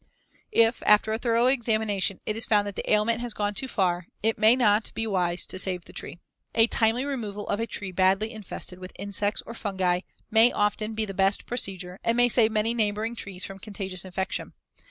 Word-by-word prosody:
If, 230 +1 +3
after 210 +1 +5
a 220 - -1
thorough 235 0 +2
examination, 220 -7 +1
it 215 - -2
is 225 - 0
found 205 -2 +3
that 205 -1 -6
the - - -3
ailment 220 +2 +2
has 240 -3 -4
gone 205 0 -1
too 265 +6 -2
far, 180 -6 0 0.2
it 225 +1 +1
may 220 +3 +6
not 215 -4 +2
be 225 - -1
wise 180 -4 0
to - - -19
try - - -4
to - - +3
save 180 -2 -3
the - - -13
tree. - - -6 0.4
A 225 - +6
timely 230 +2 +1
removal 215 -7 -4
of 205 - -1
a 230 - -1
tree 200 -3 -5
badly 190 +4 +2
infested 195 -4 -7
with 185 0 -9
insects 205 +1 -1
or 230 - -8
fungi 190 -5 0 0.3
may 225 +2 +6
often 215 +1 -1
be 220 0 0
the 195 - -6
best 195 +1 +1
procedure 190 -6 -3
and 230 +1 +1
may 245 0 +5
save 225 -2 +3
many 220 +1 +1
neighboring 220 0 -1
trees 190 -4 -5
from 195 0 -9
contagious 190 -3 -5
infection. 190 0 -3
210 Hz, 215 wpm, -26 LUFS, 195-225 Hz, 0.4 s, may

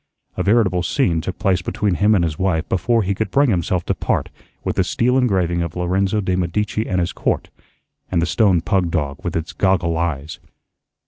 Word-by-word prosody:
A - - -2
veritable 100 -4 +2
scene 85 - +1
took 90 +3 -5
place 95 -2 +1
between 100 +2 -1
him 105 +4 +3
and 90 - +2
his 80 -3 -2
wife 90 -4 0
before 115 +5 +1
he 100 +1 0
could 110 +3 -2
bring 140 -3 +3
himself 90 -1 0
to - - 0
part - - -1 0.3
with - - -2
the 95 - +4
steel 120 +7 +1
engraving 95 -9 +1
of 85 -2 -4
"Lorenzo 95 +4 0
de' 95 -2 0
Medici 105 +5 -1
and 90 -3 +1
His 85 +1 -1
Court" - - -2 0.6
and 90 - +2
the 85 - +2
stone 90 +1 +3
pug 90 0 +1
dog 70 -4 -3
with - - -3
its 80 0 -3
goggle 90 -3 +1
eyes. 80 -2 -3
90 Hz, 200 wpm, -20 LUFS, 85-100 Hz, 0.6 s, the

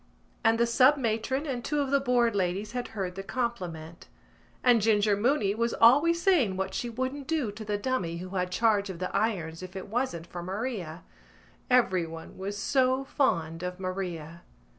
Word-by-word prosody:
And 225 0 +3
the 235 - +4
sub 255 +5 +5
matron 255 +3 -1
and 250 -5 -3
two 295 +3 -1
of 275 -2 -1
the 280 - +4
Board 245 -4 +2
ladies 195 +2 -1
had 245 0 -3
heard 185 -2 -2
the 195 - -6
compliment. 180 -8 -4 0.6
And 245 -3 +5
Ginger 210 -1 +3
Mooney 210 -1 +1
was 230 +2 -1
always 290 +9 +5
saying 305 - +3
what 190 0 -2
she 240 - -3
wouldn't 260 +4 -4
do 305 -9 0
to 215 +2 -8
the 210 -1 -1
dummy 200 -8 -2
who 185 +2 -7
had 180 -1 -2
charge 205 0 +2
of 185 - -5
the 185 +1 -4
irons 170 -7 -1
if 185 +1 -9
it 190 +1 -7
wasn't 225 -8 -2
for 175 0 -7
Maria. 185 -3 -4 0.7
Everyone 180 -10 +1
was 200 +2 -4
so 260 +4 +2
fond 165 - 0
of 180 0 -5
Maria. 175 -3 -5
210 Hz, 180 wpm, -28 LUFS, 185-250 Hz, 0.7 s, sub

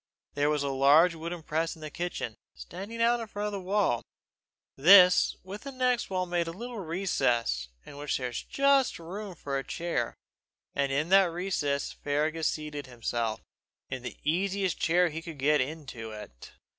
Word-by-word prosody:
There 145 +1 +1
was 150 -1 +1
a 140 - -1
large 145 +6 +5
wooden 165 +1 -6
press 165 +2 -1
in 160 - -16
the 155 -1 -6
kitchen, 170 -10 -4 0.2
standing 200 - -5
out 235 -1 +2
from 205 0 -3
the 200 -1 -4
wall; 190 - +1 0.7
this 180 +4 +7
with 195 +3 -8
the 275 - -7
next 250 -2 0
wall 185 -1 -1
made 175 -1 -1
a - - -3
little 235 +5 -7
recess, 125 - 0 0.2
in 140 - -11
which 145 0 -1
there 130 - -4
was 120 - -4
just 275 -1 +2
room 190 +3 -7
for 140 -3 -3
a - - -5
chair; 170 +4 -2 0.6
and 140 -1 0
in 150 +4 0
that 195 0 +7
recess 170 -5 -1
Fergus 155 +2 -1
seated 150 -2 -4
himself, 115 -2 -2 0.5
in 130 -1 -3
the 125 - -7
easiest 190 +3 0
chair 175 +1 +3
he 160 +1 -5
could 165 -2 -8
get 145 +2 +3
into 130 -5 -5
it. 105 - -10
165 Hz, 170 wpm, -29 LUFS, 140-190 Hz, 0.7 s, this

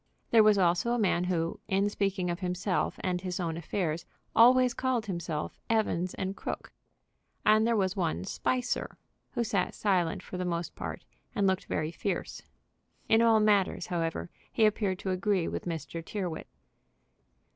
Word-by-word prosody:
There 230 - +7
was 215 -1 +5
also 180 +5 +2
a - - +1
man 185 -5 +2
who, 170 -2 -1
in 195 +1 +2
speaking 195 -3 -1
of 170 - -4
himself 180 0 -1
and 180 -1 0
his 180 -1 -3
own 165 -3 -1
affairs, 165 -1 -2 0.3
always 250 +1 +6
called 255 -4 0
himself 170 -5 -4
Evans 195 -5 +1
& 190 - -4
Crooke. - - -6 0.7
And 215 +1 +5
there 235 - +3
was 190 -2 +1
one 165 - -1
Spicer, 250 - -2 0.4
who 240 - 0
sat 200 -4 -1
silent 180 -5 +1
for 180 - -7
the 180 - -2
most 170 -1 -2
part, - - -6 0.3
and 200 - +2
looked 190 -1 +1
very 155 +1 -2
fierce. 180 +1 -3 0.7
In 225 +1 +5
all 225 -1 +5
matters, 205 -4 +2
however, 165 -1 -2 0.2
he 225 - +3
appeared 205 -3 +1
to 190 - -3
agree 185 -1 +1
with - - -4
Mr. 165 -1 -4
Tyrrwhit. 180 -3 -4
190 Hz, 160 wpm, -30 LUFS, 175-215 Hz, 0.7 s, There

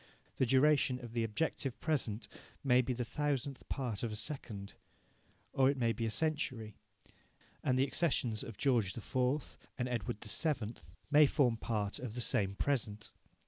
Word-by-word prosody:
The 130 - +2
duration 135 0 +4
of 120 -2 -9
the 115 -1 +1
objective 120 +3 -1
present 120 -9 -1 0.4
may 125 -2 +5
be 130 - -2
the 125 0 -2
thousandth 140 +1 -2
part 125 -7 -2
of 115 - -2
a - - -4
second. 105 -4 -4 0.8
Or 135 0 +4
it 140 - 0
may 115 -2 +2
be 115 -1 -2
a - - 0
century, 130 -6 -1 0.9
and 130 - +2
the 130 - +4
accessions 130 -9 0
of 115 - -8
George 120 -8 +2
IV. 130 +5 -1 0.2
and 125 - -1
Edward 120 -2 -2
VII. 120 -1 +1 0.4
may 150 0 +8
form 130 -5 +3
part 105 -3 -2
of 120 -3 -6
the 125 - -2
same 100 -5 +1
present. 110 -5 -1
125 Hz, 160 wpm, -34 LUFS, 110-135 Hz, 0.9 s, may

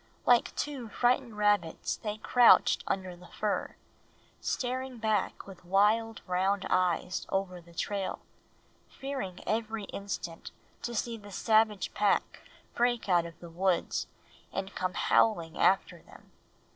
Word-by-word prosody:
Like 245 -1 +4
two 275 -5 -3
frightened 245 0 +1
rabbits 205 -6 +1
they 210 -2 -4
crouched 245 +2 +5
under 185 -2 -2
the 180 0 -15
fir, 210 -1 -2 0.6
staring 255 0 -2
back 215 -3 -1
with 190 -2 -12
wild 210 +5 +2
round 190 +2 0
eyes 180 0 +1
over 185 -2 -2
the 170 0 -18
trail, 200 +2 -2 0.7
fearing 265 -10 -5
every 220 0 -1
instant 195 -4 -6 0.3
to 240 - -4
see 230 +1 -2
the 205 -1 -12
savage 215 -1 +2
pack 205 -1 +1 0.3
break 240 -3 +1
out 175 -2 +3
of 165 - -14
the 170 - -10
woods 180 +1 0 0.4
and 195 0 -4
come 185 0 -2
howling 170 -7 +2
after 195 - +2
them. - - -18
205 Hz, 130 wpm, -30 LUFS, 185-225 Hz, 0.7 s, crouched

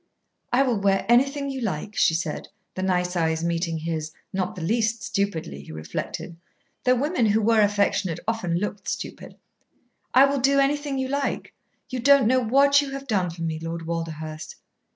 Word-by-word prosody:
"I 255 +3 +4
will 245 -6 0
wear 195 -1 +2
anything 275 +4 +3
you 265 -1 -5
like," 205 -1 -3
she 160 - +3
said, 165 -2 -3 0.3
the 185 - -4
nice 180 -1 0
eyes 160 -1 0
meeting 170 -1 -1
his, 160 -1 -3 0.2
not 185 -1 -2
the 175 - -6
least 225 +3 0
stupidly, 165 - -2
he 70 - -11
reflected, 80 - -5 0.5
though 255 0 +5
women 275 -2 +1
who 210 +1 +3
were 225 0 +4
affectionate 200 -4 +1
often 185 -7 0
looked 205 +2 -4
stupid. - - -5 0.8
"I 265 +2 +7
will 280 0 0
do 275 +2 +3
anything 280 0 +1
you 260 0 -1
like; 280 +1 -2 0.4
you 255 - -3
don't 275 0 +5
know 255 +3 +4
what 280 +4 +4
you 285 - -4
have 275 0 -6
done 195 -8 0
for 165 0 -7
me, 160 -1 -2
Lord 165 0 -5
Walderhurst." 160 -2 -5
205 Hz, 175 wpm, -25 LUFS, 165-260 Hz, 0.8 s, I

